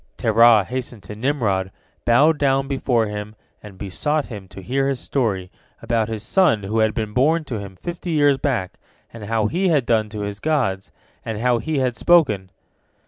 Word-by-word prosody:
Terah 115 -1 +5
hastened 125 -1 -6
to 105 +4 -9
Nimrod, 110 -7 0 0.4
bowed 145 +6 +4
down 135 -1 +2
before 130 -4 +1
him, 105 0 -6 0.3
and 100 -3 -12
besought 145 +11 -1
him 100 -5 -9
to 95 - -11
hear 135 +4 0
his 135 -2 -2
story, 100 -10 -2 0.3
about 115 -1 -1
his 110 -2 -4
son 150 - +2
who 110 +3 -1
had 110 0 +2
been 110 -2 -3
born 155 +7 +2
to 120 -7 -5
him 100 -2 -9
fifty 175 - -6
years 145 -4 +3
back, 120 -11 -2 0.3
and 115 -2 -8
how 110 0 0
he 180 - 0
had 150 -7 +2
done 110 -2 +1
to 105 -1 -6
his 100 0 -5
gods, 120 -12 -1 0.3
and 110 -2 -4
how 120 0 +2
he 150 +7 -2
had 130 -3 0
spoken. 110 - +3
115 Hz, 185 wpm, -21 LUFS, 105-140 Hz, 0.4 s, Terah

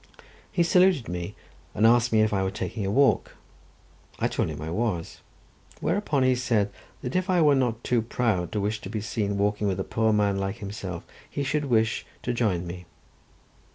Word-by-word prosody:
He 175 -4 +2
saluted 180 -6 +4
me 85 0 -4 0.4
and 110 - +3
asked 120 +1 +5
me 110 -1 +4
if 110 0 +2
I 95 - +1
were 95 - 0
taking 100 +1 -4
a - - 0
walk. 140 +5 +3 0.8
I - - +1
told - - -1
him 75 -2 -6
I 80 +1 -5
was, 95 -4 -2 0.6
whereupon 155 -9 +1
he 130 0 +4
said 115 -5 +1 0.3
that 125 - -4
if 185 +1 0
I 180 -1 +3
were 150 -3 +5
not 125 -4 0
too 120 -2 +2
proud 110 -6 -1
to 105 - 0
wish 105 +2 -1
to 95 - -7
be 110 +1 -3
seen 105 -1 -2
walking 105 +1 +1
with 95 -1 -1
a - - 0
poor 110 +2 +1
man 100 -2 +2
like 95 0 -2
himself, 100 -5 -6 0.2
he 140 - -3
should 150 +2 0
wish 115 -3 +1 0.2
to 125 - -1
join 105 -7 0
me. 90 0 -8
110 Hz, 195 wpm, -26 LUFS, 100-125 Hz, 0.8 s, asked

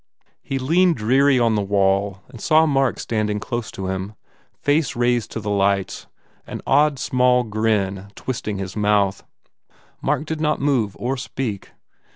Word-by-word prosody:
He 135 - -3
leaned 165 +6 +3
dreary 130 +4 +3
on 115 -2 +3
the 105 - +1
wall 100 0 +1
and 115 - -12
saw 160 0 +4
Mark 135 -4 +1
standing 105 -2 -1
close 120 0 -4
to 95 - -6
him, 95 +2 -4 0.4
face 145 -1 +1
raised 120 -1 +1
to - - -3
the 105 -1 -3
lights, 100 -1 0 0.4
an - - -6
odd 150 -1 +3
small 125 -1 +2
grin 105 -3 -1
twist 130 -4 -5
ing 105 -2 -2
his 95 -1 -5
mouth. 105 -2 +1 0.8
Mark 150 - 0
did 155 0 -4
not 150 -1 +1
move 130 -8 0
or 130 +3 -2
speak. 125 -5 -5
115 Hz, 160 wpm, -21 LUFS, 100-135 Hz, 0.8 s, saw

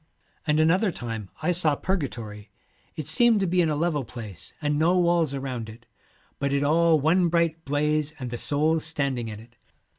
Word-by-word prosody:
'And 150 0 +2
another 180 +7 +3
time 115 - -6
I 180 - +2
saw 160 -4 +2
Purgatory. 115 - -4 0.5
It 155 -3 -5
seemed 225 +7 +5
to - - +2
be 180 0 +2
in 165 - +1
a 150 - 0
level 150 -2 0
place, 110 -7 -9
and 150 -1 0
no 170 +3 +3
walls 170 -5 +2
around 130 -5 -5
it, 115 +2 -13 0.5
but 140 0 -1
it 140 0 +1
all 160 +2 +3
one 170 +5 +3
bright 165 -1 0
blaze, 150 +1 0
and 125 -4 -6
the 120 - -4
souls 155 +2 +1
standing 140 -7 -1
in 105 -1 -7
it. 115 +1 -17
150 Hz, 185 wpm, -25 LUFS, 125-170 Hz, 0.5 s, seemed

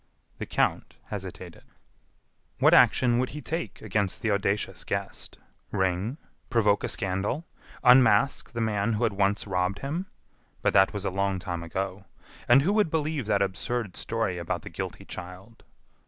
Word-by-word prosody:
The - - -4
count - - 0
hesitated. - - -7 1.0
What - - +5
action 120 -2 +5
would 130 - 0
he - - -6
take 120 - -4
against 100 -2 -1
the 110 - +1
audacious 100 -1 -1
guest? 100 0 -4 0.3
Ring? 95 +6 -1 0.3
Provoke 105 -4 +2
a - - -1
scandal? 100 - -1 0.4
Unmask 125 0 +5
the 115 - -2
man 110 0 0
who 110 +3 -1
had 115 -3 +2
once 100 +1 +1
robbed 90 0 -1
him? 165 +8 -4 0.6
But - - +2
that 95 -1 +5
was 100 -1 -4
a - - 0
long 100 0 0
time 90 -2 -4
ago! 95 +3 -4 0.4
And 130 +3 +6
who 195 +6 +2
would 210 -5 +3
believe 155 -5 -1
that 100 -2 +3
absurd 100 +1 -3
story 110 -6 -2
about 85 - -3
the - - -7
guilty - - -6
child? 95 +5 -10
105 Hz, 155 wpm, -27 LUFS, 95-120 Hz, 1.0 s, And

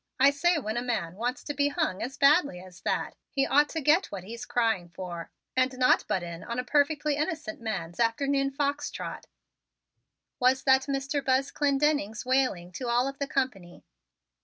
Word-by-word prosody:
I 275 +2 +7
say 345 +5 +2
when 220 -5 -3
a - - 0
man 220 -9 -2
wants 245 +7 -3
to 290 - -4
be 285 0 +2
hung 235 -9 -1
as 260 +3 -4
badly 285 - +4
as 185 0 -13
that, - - -1 0.2
he 275 -1 +1
ought 295 +2 +4
to 320 - -3
get 310 +7 +4
what 195 -3 -7
he's 235 +5 -8
crying 225 -7 0
for, 175 -1 -7 0.3
and 255 0 +1
not 250 0 +3
butt 185 - 0
in 170 -1 -7
on 235 0 -5
a 250 - 0
perfectly 290 +2 +1
innocent 305 -7 -3
man's 190 -6 -4
afternoon 275 +4 +1
fox 285 +1 -1
trot," - - -7 1.1
was 255 +1 +3
that 265 0 +4
Mr. 275 +1 -1
Buzz 265 +1 +1
Clendenning's 280 -6 +1
wailing 255 -10 +1
to 245 +7 -5
all 240 +2 +2
of 275 0 -6
the 280 - -1
company. 235 -12 -3
260 Hz, 185 wpm, -28 LUFS, 220-285 Hz, 1.1 s, I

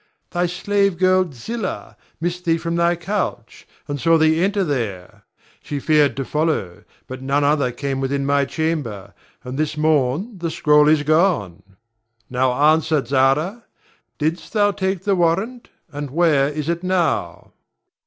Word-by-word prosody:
Thy 175 0 0
slave 200 +1 0
girl, 185 -1 +2
Zillah, 190 - -5 0.2
missed 175 +2 -3
thee 165 -1 +2
from 170 0 -3
thy 170 0 +2
couch, 170 - -4 0.2
and 145 -2 -4
saw 165 0 +4
thee 160 +1 +3
enter 200 0 +1
there. 110 - -4 0.4
She 145 - -4
feared 150 -1 +2
to 135 - -2
follow, 150 - -2 0.2
but 130 0 -8
none 140 +2 0
other 145 -3 +2
came 135 +2 -3
within 140 +1 -1
my 140 0 +2
chamber, 135 -11 -3 0.3
and 130 +3 -6
this 155 0 -1
morn 155 - 0
the 170 -1 -2
scroll 150 -1 +4
is 155 -1 +4
gone. 155 - +1 0.7
Now 130 0 +1 0.2
answer, 160 -3 0
Zara! 140 - +1 0.5
Didst 160 +3 -3
thou 205 -2 +3
take 190 -2 -2
the 200 -1 +2
warrant, 190 +8 0 0.2
and 145 -1 -5
where 145 -2 +2
is 150 0 -4
it 170 0 -1
now? 180 -5 -1
155 Hz, 150 wpm, -20 LUFS, 140-175 Hz, 0.7 s, saw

